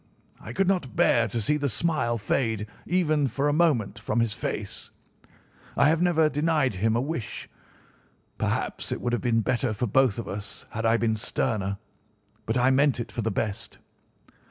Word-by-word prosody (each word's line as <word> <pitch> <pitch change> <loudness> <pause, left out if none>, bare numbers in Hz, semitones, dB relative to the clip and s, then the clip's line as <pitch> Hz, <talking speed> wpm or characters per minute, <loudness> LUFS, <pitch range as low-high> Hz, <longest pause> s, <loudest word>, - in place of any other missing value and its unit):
I - - -8
could 195 -1 +1
not 175 - 0
bear 115 -1 +4
to 120 - -3
see 150 +8 +1
the 145 -1 -1
smile 120 -2 0
fade 110 -1 -1 0.2
even 155 -5 +2
for 135 +4 -1
a 145 - +2
moment 135 -10 +2
from 115 +2 -1
his 115 -2 +1
face. - - -5 0.9
I - - +5
have 160 +1 +2
never 165 -3 +4
denied 150 -4 +1
him 110 +4 +1
a - - +2
wish. 140 -4 -4 0.9
Perhaps - - -2
it - - -2
would 120 - -2
have 120 - 0
been 115 -2 +2
better 125 0 0
for 110 +4 -1
both 125 0 +3
of 115 - -5
us 100 0 -6
had 115 +1 -1
I 115 +1 +4
been 110 -1 0
sterner, 100 -2 -1 0.7
but 115 +2 +1
I 125 +2 +4
meant 140 -1 +3
it 120 - -5
for 120 - -3
the 115 - 0
best. 105 0 -3
120 Hz, 180 wpm, -26 LUFS, 110-150 Hz, 0.9 s, I